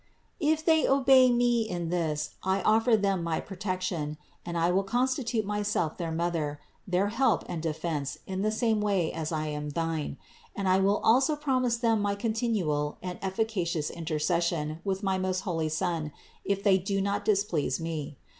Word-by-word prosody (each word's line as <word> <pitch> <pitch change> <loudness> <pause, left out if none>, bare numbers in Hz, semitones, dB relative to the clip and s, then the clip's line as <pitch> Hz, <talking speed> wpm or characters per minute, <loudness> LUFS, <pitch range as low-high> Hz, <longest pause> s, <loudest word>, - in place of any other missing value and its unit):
If 315 0 +1
they 320 -2 +4
obey 265 -1 +6
me 240 -1 +3
in 175 -6 -3
this 155 -4 -1
I 190 0 0
offer 225 +1 +4
them 195 -3 +1
my 165 -1 -1
protection, 185 -6 -3 0.3
and 170 -1 -4
I 170 +1 +2
will 190 +2 +3
constitute 245 +1 0
myself 205 -6 -1
their 170 -2 -3
Mother, 160 -3 -1 0.3
their 185 +2 +1
help 235 +5 +2
and 165 - -4
defense 155 -3 -3
in 190 0 -3
the 215 - +2
same 220 -1 +1
way 195 -5 +1
as 160 -1 -3
I 155 -1 -1
am 150 0 -4
thine, 160 -2 -2 0.4
and 200 -1 -2
I 185 +1 +4
will 200 +2 +3
also 265 +7 +4
promise 255 -5 +1
them 225 -3 +2
my 200 0 0
continual 200 -10 -1
and 180 -1 -5
efficacious 190 -6 -1
inter 165 -2 -3
cession 160 -1 0
with 195 +1 -2
my 190 -1 +1
most 185 0 -1
holy 165 -4 -1
Son, 160 -1 -1 0.3
if 200 0 -1
they 195 -2 +5
do 195 +2 -1
not 200 +1 -1
displease 195 -10 +1
me. 155 -4 -4
190 Hz, 175 wpm, -28 LUFS, 165-220 Hz, 0.4 s, obey